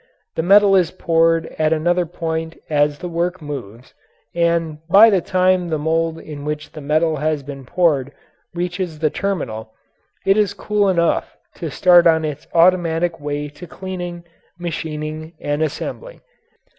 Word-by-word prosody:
The - - -1
metal 195 +3 +6
is 180 -4 +3
poured 165 -2 +2
at 155 0 +2
another 175 +2 +1
point 160 -1 -4
as 145 -1 +2
the 180 - -6
work 175 +2 -2
moves, 130 -6 -8 0.4
and 170 -2 0
by 210 +5 +8
the 190 -3 +2
time 185 0 +2
the 160 - 0
mould 160 +2 0
in 150 -3 -9
which 150 0 -4
the 155 - -9
metal 155 +2 +1
has 150 0 -1
been 135 -2 -9
poured 145 -5 +1 0.4
reaches 175 -1 -3
the 155 -1 0
terminal, 110 - -4 0.5
it 195 +1 +4
is 205 -1 +1
cool 210 -1 +1
enough 170 -3 0 0.2
to 165 - -4
start 175 +2 +5
on 160 -1 +3
its 150 -1 -6
automatic 170 -1 +3
way 145 0 -3
to 150 +5 -12
cleaning, 175 -1 -6 0.3
machining, 155 -2 -5
and 145 +1 -2
assembling. 470 - -4
165 Hz, 150 wpm, -20 LUFS, 150-180 Hz, 0.5 s, by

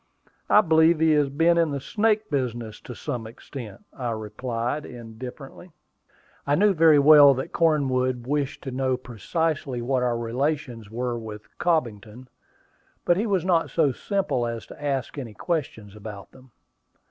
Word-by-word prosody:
I 210 - +7
believe 160 -2 +4
he 160 0 +4
has 150 -2 +3
been 165 +4 +3
in 165 -2 +2
the 140 -1 -3
snake 215 - 0
business 120 -5 -3
to 125 - -9
some 115 -1 -5
extent," 115 -2 -10
I 125 -3 -4
replied, 115 +5 -3
indifferently. 125 +8 -10 0.7
I 145 - +3
knew 205 +4 +4
very 160 -3 +5
well 145 -1 +8
that 130 - -5
Cornwood 130 -6 +1
wished 145 0 -2
to 135 - -5
know 130 0 0
precisely 135 - -3
what 125 +2 0
our 120 -1 0
relations 120 -1 -2
were 120 +1 -3
with 105 -2 -10
Cobbington; 125 - -2 0.8
but 175 - +4
he 210 +5 -1
was 190 -4 0
not 170 -3 +2
so 155 -5 +2
simple 130 - -1
as 115 -1 -5
to - - -12
ask 140 0 -2
any 115 -6 -8
questions 145 - -4
about 105 -2 -9
them. 130 0 -18
130 Hz, 155 wpm, -25 LUFS, 120-160 Hz, 0.8 s, well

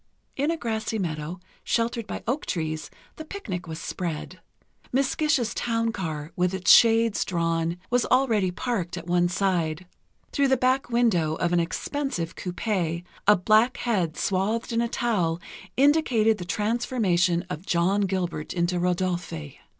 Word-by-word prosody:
In 285 +3 0
a 330 - 0
grassy 220 -3 -2
meadow, 165 -2 -3 0.2
sheltered 230 -1 -1
by - - -5
oak 260 +6 -2
trees, 155 -3 -3 0.3
the 315 - -6
picnic 200 - -6
was 160 -1 -5
spread. 170 +1 -5 0.5
Miss 270 +1 +1
Gish's 300 -7 +1
town 230 -1 0
car, 160 -6 -4
with 180 +1 +1
its 190 - +3
shades 230 -2 +6
drawn, 165 -1 -1
was 245 -1 +2
already 230 -7 +3
parked 180 -3 -3
at 170 - -7
one 175 0 +2
side. 175 -3 0 0.5
Through 280 -1 +2
the 265 0 +3
back 255 +2 +1
window 205 -10 +2
of 170 +1 0
an 175 - +4
expensive 175 - -2
coupé, 180 -3 -2 0.2
a 210 - +8
black 215 +6 +3
head 185 -10 -1
swathed 210 +5 0
in 230 - +2
a 235 - +1
towel 185 -10 0 0.4
indicated 255 -7 +3
the 175 - -5
transformation 200 -5 +1
of 180 0 -7
John 180 +4 +2
Gilbert 185 -5 -2
into 175 0 +1
Rodolphe.... 175 - -1
190 Hz, 150 wpm, -26 LUFS, 175-235 Hz, 0.5 s, a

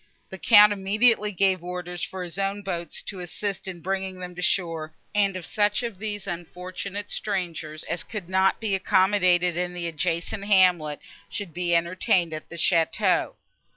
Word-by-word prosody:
The - - -8
Count 210 -2 +7
immediately 210 +2 +2
gave 190 -2 +2
orders 180 0 -5
for 185 -1 -4
his 175 +2 -7
own 195 +1 -1
boats 170 -4 -4
to 195 - -6
assist 190 +2 -4
in 175 -3 -6
bringing 190 +1 -3
them 180 -1 -7
to 180 - -7
shore, 165 -4 -1 0.2
and 200 -2 +2
that 185 -3 -5
such 210 +2 +1
of 230 -6 -5
these 205 -1 -4
unfortunate 185 +3 -6
strangers 170 -6 -3
as 170 - -3
could 200 -1 -6
not 190 +1 +2
be 220 -3 -1
accommodated 185 -2 +3
in 180 0 -2
the 175 -1 -4
adjacent 170 +4 -2
hamlet 180 -7 +3 0.3
should 200 -6 -5
be 175 -1 +1
entertained 170 0 +1
at 155 - -6
the - - -8
château. 165 -1 +2
185 Hz, 165 wpm, -25 LUFS, 175-200 Hz, 0.3 s, Count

